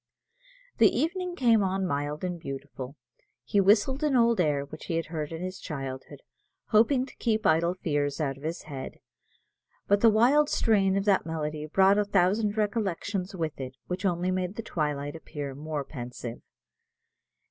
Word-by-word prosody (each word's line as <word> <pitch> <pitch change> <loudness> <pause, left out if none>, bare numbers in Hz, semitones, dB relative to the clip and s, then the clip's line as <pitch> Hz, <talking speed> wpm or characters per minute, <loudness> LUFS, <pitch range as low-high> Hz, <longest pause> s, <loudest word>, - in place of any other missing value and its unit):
The - - +7
evening 360 +2 -1
came 230 -7 +4
on 190 0 0
mild 145 -1 -2
and 180 -1 -3
beautiful. 135 -2 -7 0.5
He 200 - +2
whistled 220 +9 +3
an 295 -3 +2
old 235 -4 +4
air 145 -4 +1
which 155 +2 -10
he 165 - -2
had 165 - 0
heard 155 -1 -3
in 165 +2 -5
his 185 +1 -5
childhood, 135 -4 -6 0.5
hoping 245 +4 +4
to - - -15
keep 220 -2 0
idle 170 +3 +3
fears 145 -5 -1
out 140 -3 -1
of 135 - -16
his 160 +3 -4
head; 140 -3 -7 0.9
but 200 0 +3
the 230 - +7
wild 255 +8 +4
strain 195 -3 +2
of 195 - -1
that 195 -5 +3
melody 155 -1 -3
brought 195 +5 +4
a - - +3
thousand 205 +2 +1
recollections 200 -3 -1
with 160 -4 -3
it, 130 0 -6
which 180 +2 -4
only 180 -1 +1
made 185 +1 -2
the 230 - -5
twilight 145 -4 -2
appear 145 -3 -6
more 150 +1 -4
pensive. 125 -3 -7
180 Hz, 170 wpm, -28 LUFS, 150-210 Hz, 0.9 s, The